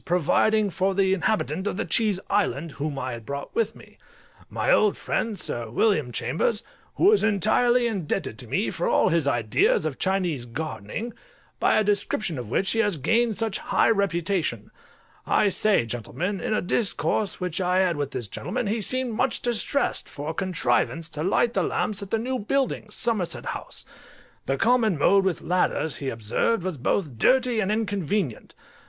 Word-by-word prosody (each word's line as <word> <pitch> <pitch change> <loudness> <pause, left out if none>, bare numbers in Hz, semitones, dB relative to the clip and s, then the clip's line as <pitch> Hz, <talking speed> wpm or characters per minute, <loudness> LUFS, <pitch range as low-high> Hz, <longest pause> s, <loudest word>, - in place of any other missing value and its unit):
providing 190 +4 +2
for 190 +2 0
the 190 -1 +3
inhabitant 190 -1 0
of 200 - -2
the 225 - -1
Cheese 210 -5 +2
Island, 170 -6 0
whom 140 +1 -4
I 130 -1 -3
had 115 -1 -7
brought 140 +5 -6
with 225 -1 0
me. - - -17 0.5
My - - 0
old 210 -2 +4
friend, 220 -3 -2
Sir 120 -9 -3
William 150 - +1
Chambers, 160 - -1 0.3
who 395 - +5
is 430 - +4
entirely 230 +4 +3
indebted 195 -9 -2
to - - -5
me - - 0
for - - -2
all - - +3
his 165 -4 +1
ideas 120 +2 +2
of 150 -4 -3
Chinese 180 -9 0
gardening, 155 - -5 0.5
by - - +3
a 215 - +4
description 200 -5 -1
of 120 -4 -7
which 190 +10 +1
he 225 - 0
has 205 -6 +2
gained 225 - +1
such 225 -3 -1
high - - +2
reputation; 175 - -1 0.6
I 205 - +3
say, 200 - +2
gentlemen, 165 - -3
in 215 - 0
a - - 0
discourse 205 +1 0
which 180 -1 -2
I 180 0 +1
had 180 -3 +2
with 145 -2 -2
this 120 -5 -5
gentlemen, 185 - -4
he 215 +2 -1
seemed 255 +3 0
much 220 - 0
distressed 240 +4 0
for 145 +2 -5
a - - -7
contrivance 165 -2 0
to 150 - -6
light 230 +6 +2
the - - +1
lamps 205 -1 -1
at 200 - -7
the 225 - +1
new 255 +3 -2
buildings, 225 -2 -1
Somerset 215 -7 -1
House; - - -6 0.6
the 135 - 0
common 225 - +3
mode 195 +7 +4
with 190 -3 -1
ladders, 165 -3 0
he 135 - -3
observed, 115 - 0
was 185 -4 -3
both 135 - -1
dirty 255 - +3
and 205 -1 0
inconvenient. 205 - -2
190 Hz, 175 wpm, -25 LUFS, 150-220 Hz, 0.6 s, who